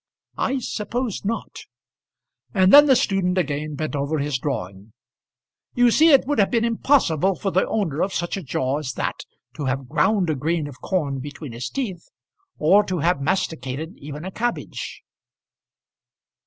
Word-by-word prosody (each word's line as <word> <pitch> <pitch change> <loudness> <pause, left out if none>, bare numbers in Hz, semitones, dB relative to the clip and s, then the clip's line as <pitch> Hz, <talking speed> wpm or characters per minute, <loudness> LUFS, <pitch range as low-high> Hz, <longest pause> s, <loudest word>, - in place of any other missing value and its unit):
"I 270 - +1
suppose 235 -1 -3
not." 225 +3 -4 1.0
And 190 -1 +4
then 290 +1 +10
the 265 - +6
student 190 -4 +1
again 150 -2 -1
bent 155 +1 -3
over 140 +2 -1
his 145 -2 -1
drawing. 100 -6 -5 0.8
"You 245 -1 +5
see 320 +7 +5
it 275 - +6
would 290 -3 0
have 200 - +4
been 235 -1 +1
impossible 205 - +2
for 195 - -2
the 185 - +2
owner 170 -9 -1
of 195 - 0
such 175 -1 -2
a 195 - -4
jaw 135 -2 -1
as 130 -5 -4
that - - -3 0.3
to 145 - -3
have 130 0 -2
ground 190 - +2
a - - -1
grain 155 +3 -1
of 125 -3 -12
corn 145 -8 -1
between 145 0 -8
his 120 +2 -5
teeth, 195 -11 -5 0.5
or 195 +7 +5
to 185 -2 -2
have 165 -2 +1
masticated 155 -1 -2
even 150 +3 -8
a 190 - -5
cabbage." 240 +5 -4
170 Hz, 165 wpm, -23 LUFS, 140-205 Hz, 1.0 s, then